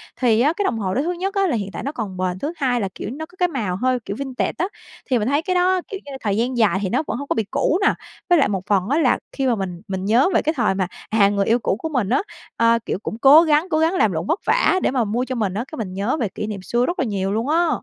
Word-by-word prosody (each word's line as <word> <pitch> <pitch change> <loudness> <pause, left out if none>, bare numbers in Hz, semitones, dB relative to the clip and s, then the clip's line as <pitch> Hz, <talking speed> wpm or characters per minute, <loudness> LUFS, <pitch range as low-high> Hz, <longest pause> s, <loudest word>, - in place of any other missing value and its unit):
Thì 235 -3 +2
á, 295 +5 +3
cái 410 - -2
đồng 230 -11 0
hồ 190 -3 -2
đó 265 - +1
thứ 335 +4 -1
nhất 375 +3 -3
á 390 -1 +2
là 310 - 0
hiện 200 -3 -3
tại - - -5
nó 280 - -2
còn 210 -9 -5
bền, 185 0 -2
thứ 300 - -3
hai 250 -4 +1
là, 195 - -1
kiểu, - - -5
nó 315 +3 -6
có 350 +3 -22
cái 360 - +3
màu 225 - -2
hơi, 255 +5 0
kiểu, 200 - -4
vintage 265 -2 -2
á, 360 - +1 0.4
thì 250 -3 +3
mình 210 - -1
thấy 285 +3 +2
cái 365 +2 -2
đó, 365 +1 +3
kiểu 395 - -6
như, 285 - -9
thời 205 -1 0
gian 245 +2 0
dài 205 -5 +3
thì 195 - -1
nó 255 +8 0
vẫn - - -2
hông 285 +2 -6
có - - +1
bị 225 - +1
cũ 285 +5 +1
nè. - - +4 0.4
Với 350 -2 +5
lại 280 - +4
một 190 -2 -2
phần 195 -2 +1
á 285 - +2
là 270 -6 +3
khi 270 -1 -1
mà 245 - +2
mình 180 -4 -5
mình 190 -1 -3
nhớ 235 - +4
về - - +3
cái 315 - 0
thời 235 -6 +2
mà, 190 -2 0 0.2
à, 205 -2 +4
người 200 -1 0
yêu 230 +4 +3
cũ 210 - 0
của 320 - -4
mình 250 -10 -1
á, 255 - +2 0.4
ờ, 230 0 +4
kiểu, - - -2
cũng 220 - -4
cố 280 +5 +8
gắng 315 +1 +2
cố 310 - +1
gắng 325 +2 +2
làm 220 - +2
lụng 165 -1 -3
vất 345 - +1
vả 450 -4 +3
để - - +2
mà 255 -3 +1
mua 230 +4 -1
cho 255 - -4
mình 210 -6 -1
á, 215 +4 -2
cái 310 - -7
mình 195 -7 -4
nhớ 205 +10 -1
về 225 - 0
kỷ 210 - -5
niệm 205 -3 -5
xưa 240 +6 0
rất 345 - -3
là - - +1
nhiều 195 -3 -2
luôn 225 +6 -1
á. 335 +2 +3
245 Hz, 325 wpm, -21 LUFS, 205-305 Hz, 0.4 s, cố